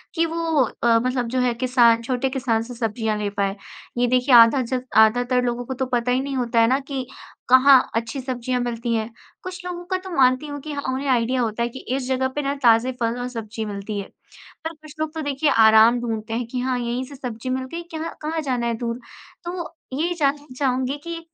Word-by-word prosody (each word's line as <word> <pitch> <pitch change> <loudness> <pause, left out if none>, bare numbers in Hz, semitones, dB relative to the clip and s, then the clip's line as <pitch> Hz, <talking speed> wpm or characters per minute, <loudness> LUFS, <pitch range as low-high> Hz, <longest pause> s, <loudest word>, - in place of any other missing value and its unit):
कि 330 0 +2
वो 325 -3 +1 0.2
अ, 230 -1 +5
मतलब 250 0 -1
जो 255 - -1
है 245 -1 +2
किसान 235 -2 +3
छोटे 255 +2 -1
किसान 245 -4 0
से 245 +2 -9
सब्ज़ियाँ 220 -2 -1
ले 205 -1 -2
पाए। 200 -1 -1 0.4
ये 245 - +2
देखिए 250 +1 +4
आधाजक 250 +2 +5
आधातर 245 +3 +4
लोगों 245 0 -2
को 260 - -4
तो 260 +1 -2
पता 245 -1 0
ही 255 - +2
नहीं 275 0 -4
होता 235 -2 +1
है 230 - +5
ना 260 +3 +2
कि 270 -2 -5 0.4
कहाँ 260 +1 +8 0.2
अच्छी 230 +4 -2
सब्ज़ियाँ 250 -1 -2
मिलती 235 -1 -2
हैं। 220 0 -2 0.3
कुछ 370 0 -7
लोगों 355 -1 -5
का 370 - +2
तो 375 +1 -9
मानती 255 +2 +3
हूँ 290 0 -6
कि 305 - -7
हाँ, 285 - -4
उन्हें 275 +2 -3
आईडिया 250 0 +2
होता 230 0 -1
है 235 - -1
कि 260 +2 -9 0.2
इस 265 -2 -3
जगह 260 0 +1
पे 295 - 0
ना 280 0 -1
ताज़े 235 +2 +5
फल 230 +1 0
और 245 - -3
सब्ज़ी 220 -2 -5
मिलती 205 0 -5
है। 195 - -6 0.6
पर 325 - -3
कुछ 310 -1 -15
लोग 315 0 -2
तो 320 - -3
देखिए 285 0 0
आराम 220 +2 +6
ढूँढते 225 -2 -4
हैं 240 +2 -1
कि 250 +1 -4
हाँ, 255 0 0
यहीं 240 +2 -2
से 280 - -11
सब्ज़ी 250 -1 -6
मिल 260 0 -1
गई। 340 - -3
क्यहाँ 320 +1 -5
कहाँ 315 +1 -2
जाना 250 -4 -1
है 235 - 0
दूर। 235 +1 -3 0.5
तो 345 -1 -5 0.2
ये 330 +6 0
जानना 290 0 0
चाहूँगी 260 0 0
कि 335 0 -5
250 Hz, 225 wpm, -22 LUFS, 235-275 Hz, 0.6 s, कहाँ